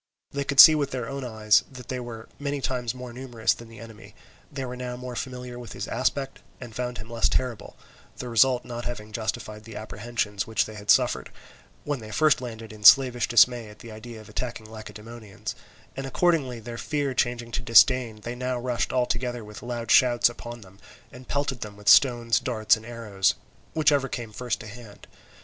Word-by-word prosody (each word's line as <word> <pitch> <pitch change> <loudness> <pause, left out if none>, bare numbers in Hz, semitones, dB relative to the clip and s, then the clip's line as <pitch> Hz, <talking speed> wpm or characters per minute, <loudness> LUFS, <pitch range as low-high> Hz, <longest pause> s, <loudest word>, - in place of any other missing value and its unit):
They 140 0 -2
could 140 -1 -1
see 155 - +12
with 145 -3 0
their 125 -3 -4
own 140 +1 -5
eyes 110 -3 +3
that 125 -2 -11
they 130 - -3
were 115 -2 -8
many 145 0 -2
times 125 -2 -2
more 125 -1 -8
numerous 120 -3 -1
than 115 - -12
the 115 0 -14
enemy; 110 -1 -12 0.4
they 135 -2 -4
were 125 0 -6
now 125 -1 -5
more 125 0 -7
familiar 125 -1 -6
with 120 - -9
his - - -5
aspect 135 +2 -1 0.2
and 120 -3 -10
found 125 -1 -3
him 110 +1 -9
less 115 -1 +1
terrible, 125 -4 -3 0.4
the 125 - -6
result 120 +2 +3
not 120 0 -6
having 110 -3 -6
justified 110 -1 -4
the 110 -1 -11
apprehensions 105 -1 -3
which 110 - +1
they 110 - -9
had 105 -1 -11
suffered, - - +3 0.5
when 145 -2 -2
they 110 -2 -10
first 150 +6 +3
landed 115 -3 -8
in 105 -1 -13
slavish 125 0 +7
dismay 120 -1 +4
at 105 - -14
the 115 +1 -11
idea 110 +1 -9
of 110 - -13
attacking 110 +1 -5
Lacedaemonians; 110 -1 -8 0.4
and 135 0 -4
accordingly 135 -5 +1
their 115 +1 -8
fear 145 -3 -1
changing 120 -1 -1
to 120 - -2
disdain, 120 -2 +4
they 120 +3 -5
now 125 0 -2
rushed 120 -1 -2
all 125 -1 +2
together 120 -1 -3
with 105 0 -10
loud 120 -2 -4
shouts 120 -2 +5
upon 120 0 -9
them, 100 0 -16 0.3
and 125 0 -13
pelted 140 -3 -2
them 105 -1 -7
with 105 - -14
stones, 120 -3 +5
darts, 110 -4 +2
and 110 +1 -11
arrows, 105 -5 0 0.4
whichever 145 -4 +3
came 120 -3 -5
first 120 +2 -3
to 105 - -9
hand. 110 -1 -12
120 Hz, 200 wpm, -26 LUFS, 110-125 Hz, 0.5 s, see